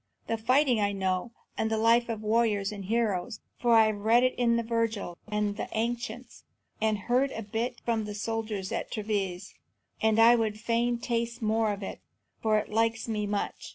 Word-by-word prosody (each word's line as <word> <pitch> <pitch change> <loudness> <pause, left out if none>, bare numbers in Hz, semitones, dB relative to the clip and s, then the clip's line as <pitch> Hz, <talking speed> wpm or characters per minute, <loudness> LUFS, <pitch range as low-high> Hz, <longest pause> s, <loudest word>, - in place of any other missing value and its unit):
And 225 -1 -2
fighting 255 -1 +3
I 205 0 +1
know, 190 +2 -1 0.3
and 220 - +1
the 220 - 0
life 230 +2 +3
of 220 -2 -4
warriors 215 -2 +1
and 200 -2 -7
heroes, 215 -1 -1 0.2
for 240 -1 +4
I 220 -1 +7
have 215 -1 0
read 225 +4 +4
of 255 - +3
it - - -12
in 235 -1 +3
Virgil 225 -5 -1
and 210 -1 -1
the - - -4
ancients, 235 +1 -4 0.4
and 215 -1 +2
heard 255 +3 +2
a 225 - -5
bit 230 +4 -3
from 225 -2 0
the 210 0 -6
soldiers 215 -2 -3
at - - -3
Treves; 200 -3 -3 0.5
and 220 0 +3
I 230 +1 +8
would 215 -2 -1
fain 235 +1 +1
taste 235 0 -2
more 220 0 +2
of 200 0 -5
it, - - -6 0.4
for 215 -1 +3
it 210 - -2
likes 225 +1 0
me 210 -2 -1
much. 205 0 -3
220 Hz, 190 wpm, -28 LUFS, 210-235 Hz, 0.5 s, I